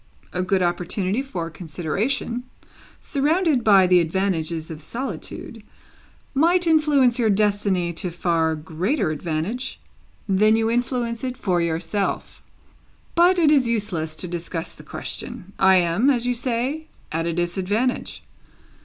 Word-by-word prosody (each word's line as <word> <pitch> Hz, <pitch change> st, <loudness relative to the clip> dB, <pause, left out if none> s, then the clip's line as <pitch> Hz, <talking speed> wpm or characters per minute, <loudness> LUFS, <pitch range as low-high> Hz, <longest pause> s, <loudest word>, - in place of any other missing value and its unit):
A 180 Hz, -, 0 dB
good 185 Hz, 0 st, +1 dB
opportunity 185 Hz, +5 st, 0 dB
for 175 Hz, -11 st, -5 dB
consideration, 190 Hz, -, -2 dB, 0.6 s
surrounded 300 Hz, -1 st, +1 dB
by 195 Hz, -4 st, +6 dB
the 180 Hz, 0 st, +5 dB
advantages 165 Hz, -2 st, -1 dB
of 155 Hz, 0 st, -8 dB
solitude, 245 Hz, -, -6 dB, 0.7 s
might 345 Hz, +5 st, +3 dB
influence 295 Hz, -6 st, +3 dB
your 225 Hz, -2 st, +3 dB
destiny 200 Hz, -4 st, +1 dB
to 180 Hz, +2 st, -3 dB
far 165 Hz, -2 st, 0 dB
greater 165 Hz, -, -1 dB
advantage 165 Hz, -, -3 dB, 0.5 s
than 210 Hz, +2 st, +4 dB
you 225 Hz, 0 st, +1 dB
influence 240 Hz, -1 st, -1 dB
it 255 Hz, -1 st, -3 dB
for 180 Hz, -3 st, 0 dB
yourself. 170 Hz, +4 st, -2 dB, 0.7 s
But 350 Hz, +2 st, +5 dB
it 320 Hz, -4 st, +4 dB
is 275 Hz, -5 st, +4 dB
useless 195 Hz, -9 st, -1 dB
to 180 Hz, -, -5 dB
discuss 170 Hz, -1 st, -5 dB
the -, -, -14 dB
question. 195 Hz, +2 st, -7 dB
I 190 Hz, 0 st, +6 dB
am, 180 Hz, +8 st, +3 dB
as 245 Hz, -4 st, +2 dB
you 245 Hz, -, +1 dB
say, 255 Hz, +6 st, -2 dB, 0.2 s
at 165 Hz, +1 st, -1 dB
a 170 Hz, -, -1 dB
disadvantage. 190 Hz, +8 st, -1 dB
200 Hz, 130 wpm, -23 LUFS, 170-250 Hz, 0.7 s, by